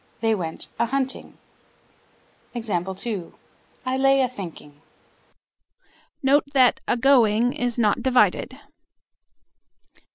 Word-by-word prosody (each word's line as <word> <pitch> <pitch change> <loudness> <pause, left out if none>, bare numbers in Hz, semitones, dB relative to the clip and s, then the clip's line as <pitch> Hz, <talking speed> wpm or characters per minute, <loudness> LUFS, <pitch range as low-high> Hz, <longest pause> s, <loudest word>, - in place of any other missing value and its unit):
They 225 -1 +2
went 170 -6 -3
a 235 - +2
hunting. 265 +1 -3 1.2
I 205 +4 -5
lay 270 0 +4
a 255 - +2
thinking. 165 -10 -10 1.4
Note 275 +2 +4
that 255 -3 +4
"agoing" 240 -2 +3
is 245 -1 -2
not 220 0 +1
divided. 255 0 +2
240 Hz, 85 wpm, -23 LUFS, 205-260 Hz, 1.4 s, lay